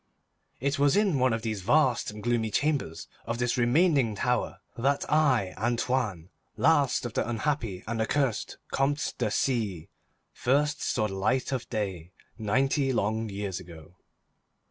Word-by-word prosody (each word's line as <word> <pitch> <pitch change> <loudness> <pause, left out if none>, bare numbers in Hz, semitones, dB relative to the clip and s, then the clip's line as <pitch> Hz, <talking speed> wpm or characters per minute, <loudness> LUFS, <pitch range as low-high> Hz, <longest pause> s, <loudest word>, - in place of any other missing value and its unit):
It 140 +3 -1
was 145 +5 +4
in 195 -9 +2
one 130 0 +3
of 115 -1 -2
the 110 -2 -1
vast 120 +6 +2
and 105 0 -9
gloomy 120 -2 +1
chambers 140 - -1 0.2
of 115 0 -2
this 125 0 0
remaining 125 - +3
tower 125 +4 -1 0.2
that 140 +4 +1
I, 130 -12 +3
Antoine, 115 -6 -1 0.3
last 145 -6 +3
of 120 - -4
the - - -1
unhappy 115 -5 -2
and 115 0 -2
accursed 130 0 0 0.2
Comtes 145 +2 +1
de 115 -4 -1
C——, 105 - -1 0.4
first 145 +4 +1
saw 110 - 0
the 95 - -6
light 110 +8 0
of 130 -3 -3
day, 95 -6 -4 0.3
ninety 135 +6 +1
long 110 -1 0
years 100 -2 -4
ago. 85 -1 -13
120 Hz, 145 wpm, -28 LUFS, 105-135 Hz, 0.4 s, was